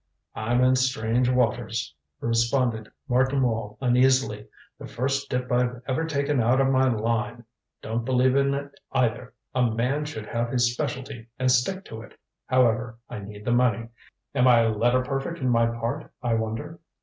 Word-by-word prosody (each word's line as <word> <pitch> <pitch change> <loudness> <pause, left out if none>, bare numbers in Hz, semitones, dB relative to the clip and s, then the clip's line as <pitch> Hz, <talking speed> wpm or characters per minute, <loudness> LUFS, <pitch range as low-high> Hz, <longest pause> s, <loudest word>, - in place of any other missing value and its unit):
"I'm 120 +3 +1
in 130 0 +5
strange 125 -1 +1
waters," 120 -5 0 0.3
responded 115 -1 0 0.2
Martin 130 +2 +2
Wall 110 -3 -2
uneasily. 125 -4 +2 0.3
"The - - -8
first 140 +3 -2
dip 125 0 -2
I've 125 0 0
ever 140 +5 0
taken 140 -3 0
out 120 +4 +3
of 135 0 +3
my 130 0 +3
line. 115 +1 -2 0.4
Don't 115 +1 -2
believe 130 +1 +2
in 140 0 +2
it 140 0 -7
either 125 -1 0 0.2
a 125 - +1
man 125 +7 -1
should 110 -8 -6
have 115 +2 -2
his 120 -1 +2
specialty 125 -2 -5
and 130 0 +2
stick 185 +11 +1
to 110 0 -8
it. 110 - -14 0.3
However, 120 -2 +2
I - - -5
need 105 +1 -10
the 120 - 0
money. 115 -2 +2 0.4
Am 125 - +3
I 120 -2 +6
letter 120 +3 +2
perfect 135 +5 -3
in 130 -4 -1
my 115 -1 +3
part, 115 0 -4
I 120 -2 +1
wonder?" 110 +8 -3
125 Hz, 165 wpm, -25 LUFS, 115-130 Hz, 0.4 s, I